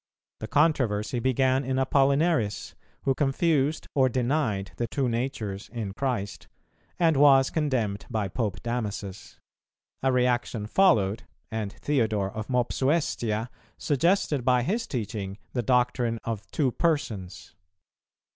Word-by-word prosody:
The 110 - -5
controversy 125 -7 +1
began 130 +2 +2
in 130 0 -1
Apollinaris, 140 -2 +1 0.3
who 135 - +2
confused 145 +1 +1
or 130 -2 +3
denied 120 -6 -1
the 120 - -1
Two 135 +1 -1
Natures 115 -5 -3
in 110 -5 -4
Christ, 110 -5 -3 0.5
and 165 -3 +3
was 135 -1 +6
condemned 125 -10 -1
by 110 -4 -1
Pope 105 +1 -3
Damasus. 105 -5 -4 0.6
A 135 - +2
reaction 125 -3 0
followed, 110 - +3 0.3
and 110 -3 -3
Theodore 110 -8 0
of 110 +1 -6
Mopsuestia 125 -3 0 0.3
suggested 150 -1 +1
by 125 -1 +3
his 225 - -1
teaching 105 -5 -4 0.2
the 125 - 0
doctrine 125 -1 +1
of 110 -3 -5
Two 135 -5 +1
Persons. 110 - -2
125 Hz, 120 wpm, -27 LUFS, 110-140 Hz, 0.6 s, was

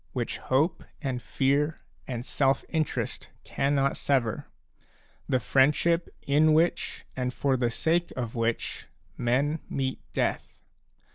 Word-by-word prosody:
which 120 -3 -2
hope 155 +6 +1 0.2
and 130 -4 -3
fear 145 +5 +1 0.3
and 120 -2 -4
self 135 -1 +1
interest 160 -2 -2
cannot 140 0 +1
sever, 125 -6 0 0.8
the 130 - +3
friendship 150 +7 +3
in 155 +2 +4
which 165 +2 +1
and 125 -1 -2
for 135 -2 +2
the 120 -2 +1
sake 165 +8 +1
of 120 -3 -3
which 115 -1 -2 0.3
men 140 +6 +1
meet 130 -1 -2
death. - - -2
135 Hz, 120 wpm, -28 LUFS, 125-150 Hz, 0.8 s, in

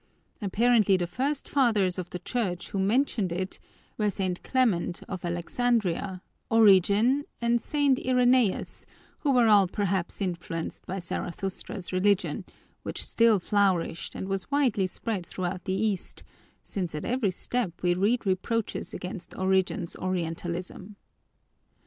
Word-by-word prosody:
Apparently 215 -1 +3
the 175 - -1
first 270 - -2
fathers 215 -10 +2
of 180 - -5
the - - -5
Church 185 -3 -2
who 195 - -3
mentioned 210 -1 +1
it 185 +2 -3 0.4
were 210 -1 +2
St. 185 -3 -2
Clement 210 -9 0
of 185 -2 -6
Alexandria, 185 +1 -1 0.3
Origen, 220 +5 +5 0.2
and 235 0 +2
St. 285 -3 +2
Irenaeus, 250 -4 +2 0.3
who 290 - +1
were 250 -3 +5
all 205 -3 +6
perhaps 195 -2 -2
influenced 170 -3 -4
by 190 - -3
Zarathustra's 190 +2 -4
religion, 200 +2 +1 0.4
which - - -3
still 230 -2 +4
flourished 185 -3 0
and 190 - -4
was 195 -1 -2
widely 255 -9 +2
spread 200 0 -3
throughout 180 +1 -4
the 190 - -1
East, 200 -1 -1 0.4
since 180 -5 -3
at 150 - -4
every 245 -4 +1
step 190 -1 -2
we 175 0 +3
read 210 +6 +1
reproaches 200 +4 -1
against 180 -1 -7
Origen's 190 -2 +1
Orientalism. 180 +2 -4
195 Hz, 130 wpm, -27 LUFS, 180-230 Hz, 0.4 s, all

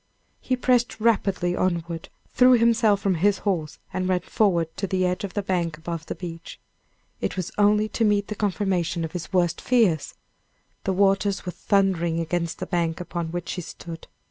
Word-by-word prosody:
He 255 - 0
pressed 245 -2 +1
rapidly 195 -5 +1
onward, 170 -3 -2 0.2
threw 255 0 +6
himself 230 -4 +4
from 195 -3 +2
his 195 +4 +2
horse, 165 -7 -1 0.2
and 185 0 -1
ran 180 -1 +2
forward 170 -5 +1
to 195 - -2
the 185 0 +1
edge 180 +2 -1
of 195 - -5
the 205 - 0
bank 170 -4 -1
above 165 0 -6
the - - -4
beach. 165 -2 -8 0.6
It - - -3
was 185 - -3
only 210 +1 +4
to 225 - -1
meet 205 -2 +2
the - - -3
confirmation 185 -5 -1
of 160 - -7
his 180 +1 -6
worst 175 -3 +1
fears! 215 - +2 0.7
The 190 - +1
waters 195 +1 +2
were 180 - -3
thundering 180 -4 +1
against 170 0 -2
the - - -4
bank 170 -2 -1
upon 175 -1 -4
which 175 0 -4
he 180 - -3
stood. 165 0 -9
185 Hz, 180 wpm, -24 LUFS, 170-205 Hz, 0.7 s, threw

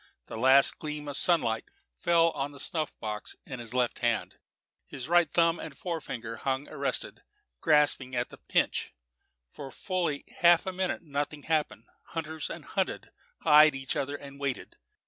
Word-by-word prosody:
A - - -6
last 130 +4 +5
gleam 150 -1 -5
of 145 - -3
sunlight 120 -10 +2 0.3
fell 165 - +3
on 140 0 -4
the 140 - -12
snuff 155 +2 -2
box 105 0 -4
in 130 -2 -6
his 120 +1 -6
left 125 -2 +1
hand; 120 0 -1 0.5
his 130 -2 -7
right 175 -2 +4
thumb 165 0 +3
and 145 -4 -8
fore 170 -3 -3
finger 115 -4 -6
hung 135 +4 -2
arrested, - - -2 0.4
grasping 150 -4 +3
the 120 0 -3
pinch. - - 0 0.6
For 140 - -8
fully 170 -2 -2
half 170 -1 +6
a 190 - -3
minute 185 -1 -2
nothing 145 -1 -3
happened; 155 -2 -1 0.2
hunters 160 -1 -5
and - - -7
hunted - - -2 0.3
eyed 150 -1 +7
each 135 -1 -3
other 140 +1 -2
and 140 -1 -10
waited. 140 -3 -3
145 Hz, 160 wpm, -29 LUFS, 130-165 Hz, 0.6 s, eyed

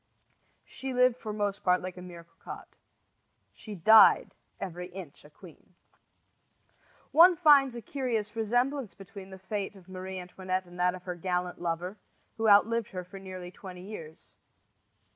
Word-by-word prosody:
She 265 -1 -6
lived 250 -1 +4
for 220 -3 -6
most 205 -1 -2
part 180 0 +3
like 185 0 -7
a 180 - -10
mere 175 -2 -10
cocotte. 165 0 -12 0.8
She 215 -2 -9
died 220 +5 +6 0.3
every 180 -1 -6
inch 180 -5 -10
a 150 - -15
queen. 175 +2 -17 1.4
One 345 +3 +7
finds 285 -6 +5
a 235 - -7
curious 230 -5 -3
resemblance 245 +3 0
between 195 0 -11
the 190 - -10
fate 200 +1 -4
of 190 -2 -17
Marie 185 0 -7
Antoinette 185 +1 -4
and 175 0 -13
that 180 0 +2
of 180 - -11
her 180 - -4
gallant 180 0 -3
lover, 175 +4 -3 0.4
who 225 -1 +2
outlived 220 +2 +4
her 185 -2 -6
for 195 +2 -11
nearly 185 -2 -8
twenty 180 -1 -10
years. 165 -6 -10
190 Hz, 155 wpm, -29 LUFS, 180-220 Hz, 1.4 s, One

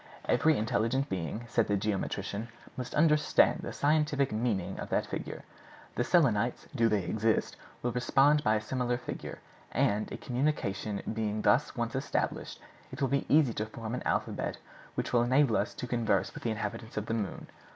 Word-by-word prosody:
'Every 160 -1 +4
intelligent 115 +5 0
being,' 95 +5 -3
said 115 -1 +1
the 105 - +2
geometrician, 100 +1 -2 0.3
'must 125 -1 -5
understand 150 -1 +4
the - - -5
scientific 145 -2 +2
meaning 105 -5 -1
of - - -5
that - - +1
figure. - - -5 0.5
The 120 - 0
Selenites, 120 - +2
do 115 -4 +3
they 105 -3 +1
exist, 110 +4 0 0.3
will 120 - +1
respond 135 +5 +3
by 110 -1 +3
a 105 - 0
similar 125 +2 -1
figure; 125 - -6 0.3
and, 105 +1 +1
a - - -4
communication 120 -7 -1
being 110 -1 -2
thus 140 - +3
once 120 -1 -2
established, 135 +2 -2 0.3
it - - -8
will 135 - +1
be 140 0 0
easy 145 -5 +5
to 110 0 -3
form 110 +1 -6
an 125 - -2
alphabet - - -1 0.4
which - - -2
shall 120 - +4
enable 130 0 +3
us 105 - 0
to - - -4
converse 120 -2 0
with - - -8
the 120 - -1
inhabitants 110 +1 -4
of 105 - -1
the 115 - -2
moon. 105 -4 -3
115 Hz, 175 wpm, -30 LUFS, 105-135 Hz, 0.5 s, easy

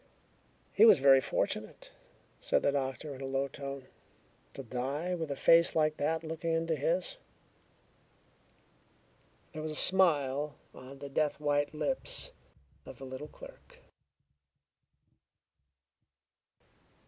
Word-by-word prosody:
"He 210 - +5
was 225 - +9
very 135 -1 +6
fortunate," - - -3 0.5
said - - 0
the - - +3
doctor 140 +1 -3
in 135 - -10
a 135 - -4
low 135 +1 -1
tone, 140 -1 -7 0.7
"to 135 - -7
die 135 +8 -3
with 165 -3 -3
a 140 - -2
face 165 +4 +5
like 155 -1 +2
that 160 +2 -1
looking 165 +1 -3
into 165 0 0
his." 170 +5 -1 2.4
There 155 - -6
was 155 0 -4
a - - -7
smile 150 -6 +2 0.2
on 130 +2 -12
the 140 +1 -8
death 150 +2 -1
white 145 0 0
lips 280 - -2 0.5
of - - -11
the 135 - -9
little 130 +3 -7
clerk. - - -15
145 Hz, 120 wpm, -31 LUFS, 135-160 Hz, 2.4 s, was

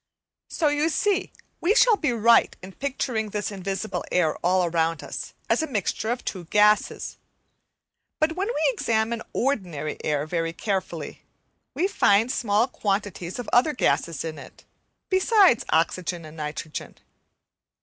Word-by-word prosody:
So, 310 -4 +1
you 295 +2 +1
see, 405 +4 0 0.3
we 390 +6 +2
shall - - +6
be 305 -9 0
right 230 0 +4
in 185 - -8
picturing 250 -3 -2
this 210 0 -3
invisible 195 +2 -3
air 160 -4 +2
all 180 +1 +2
around 165 -1 0
us - - -7
as - - +2
a 315 - -2
mixture 220 - -2
of 245 +1 -2
two 180 -3 -4
gases. 210 +4 +2 1.0
But 310 0 +2
when 385 +2 -1
we 315 -11 +1
examine 225 0 0
ordinary 180 - -2
air 150 -1 0
very 165 0 -2
carefully, 195 +1 -4 0.5
we 365 - +2
find 225 - +3
small 225 -2 +1
quantities 195 -6 -3
of 245 - -6
other 265 +6 +4
gases 170 - 0
in 155 -2 -5
it, 130 - -14 0.4
besides 375 - +4
oxygen 170 +1 0
and 155 0 -11
nitrogen. 155 0 -6
210 Hz, 140 wpm, -25 LUFS, 175-275 Hz, 1.0 s, shall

